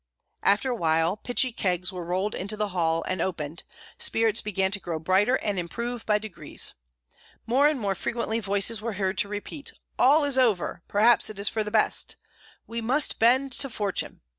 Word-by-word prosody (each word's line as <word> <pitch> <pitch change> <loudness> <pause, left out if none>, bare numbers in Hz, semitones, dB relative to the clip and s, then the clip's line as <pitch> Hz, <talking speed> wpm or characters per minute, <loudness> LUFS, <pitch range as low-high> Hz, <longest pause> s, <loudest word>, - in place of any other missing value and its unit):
After 215 +6 +2
a - - -1
while 165 -1 +1
pitchy 245 +3 0
kegs 180 -4 -1
were 180 -1 -5
rolled 185 +5 -1
into 200 +3 -3
the 210 -1 -1
hall 165 -3 0
and 185 - -2
opened. 165 -3 -3 0.4
Spirits 225 -1 +3
began 190 -2 0
to 205 - -1
grow 170 -4 -4
brighter 190 +9 +2
and 205 -6 -2
improve 235 +7 -4
by 210 -1 +4
degrees. 210 -5 -3 0.7
More 260 +6 +4
and 300 -3 0
more 200 -3 0
frequently 230 +2 -2
voices 205 +1 0
were 230 0 -3
heard 190 0 -1
to - - +2
repeat: 205 +8 -6 0.3
"All 290 +5 +5
is 275 -2 +1
over! 215 -8 +2
perhaps 220 +3 +4
it 215 - -9
is 200 +1 +1
for 220 - -1
the 210 - -5
best!" 215 0 0 0.5
"We 230 0 -5
must 265 +6 +1
bend 260 +4 +4
to 275 +3 +2
fortune!" 205 -4 -4
210 Hz, 185 wpm, -26 LUFS, 185-235 Hz, 0.7 s, All